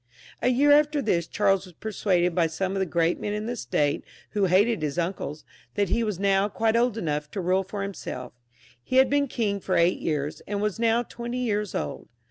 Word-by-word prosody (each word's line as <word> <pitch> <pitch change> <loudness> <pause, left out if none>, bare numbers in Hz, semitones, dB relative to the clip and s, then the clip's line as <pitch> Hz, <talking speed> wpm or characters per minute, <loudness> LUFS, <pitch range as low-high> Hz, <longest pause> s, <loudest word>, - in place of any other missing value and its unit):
A - - +1
year 270 +4 +4
after 300 0 +4
tl]as, 170 -1 0
Charles 195 -2 +2
was 180 - -16
persuaded 185 -4 0
by 165 -1 +2
some 185 +4 -2
of 195 - -1
the 190 - 0
great 170 0 +1
men 205 - -3
in 210 +1 -3
the 240 - -2
State^ 145 - 0 0.3
who 205 -2 +1
hated 195 +3 +3
his 150 0 -2
uncles, 170 -3 -3 0.3
that 200 -3 +1
he 230 - +1
was 210 -5 -2
now 195 +1 +2
quite 220 +2 +1
old 235 -1 +2
enough 150 -5 -2
to 200 - -5
rule 185 +1 +2
for 195 +1 -4
himsel£ 125 -10 -7 0.5
He 255 - -4
had 265 +1 +5
been 285 0 +2
king 210 -5 -1
for 185 -1 -1
eight 170 +2 +3
years, 150 -2 -2
and 205 0 -2
was 210 +1 -1
now 230 +1 +3
twenty 240 +1 -6
years 210 -4 -1
old. 75 - -4
195 Hz, 215 wpm, -26 LUFS, 170-225 Hz, 0.5 s, had